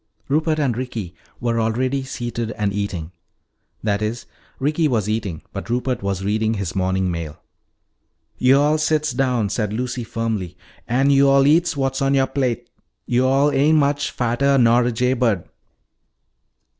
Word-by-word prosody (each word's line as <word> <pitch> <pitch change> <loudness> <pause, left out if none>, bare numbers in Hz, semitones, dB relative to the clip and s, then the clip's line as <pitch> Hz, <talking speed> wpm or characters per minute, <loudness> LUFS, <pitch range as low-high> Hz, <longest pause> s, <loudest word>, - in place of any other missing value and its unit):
Rupert 155 +2 +1
and 135 -6 0
Ricky 115 -8 -5 0.3
were 115 -1 0
already 130 +5 0
seated 120 -3 -4
and 100 -2 -1
eating. 95 -5 -3 0.7
That 105 -1 0
is, 110 +3 -3 0.3
Ricky 155 +4 +1
was 110 -7 0
eating, 105 -7 -3
but - - -6
Rupert 125 +1 -1
was 100 -1 -2
reading 110 +2 0
his 100 -4 -3
morning 95 0 0
mail. 80 -3 -5 1.0
"Yo'all 145 +4 +4
sits 155 -1 +1
down," 125 -6 0
said 105 0 -1
Lucy 125 +2 -3
firmly, 110 -6 -3 0.3
"an' 135 +4 +2
yo'all 140 0 +5
eats 165 +2 +3
what's 135 -1 -1
on 135 0 +2
youah 135 -1 +3
plate. 120 -3 -1 0.4
Yo'all 130 +4 +2
ain' 145 +3 +3
much 145 -1 +1
fattah 130 +3 +1
nor 120 0 +4
a 125 - +1
jay 125 +2 +1
bird." 115 -8 0
120 Hz, 145 wpm, -21 LUFS, 110-135 Hz, 1.0 s, yo'all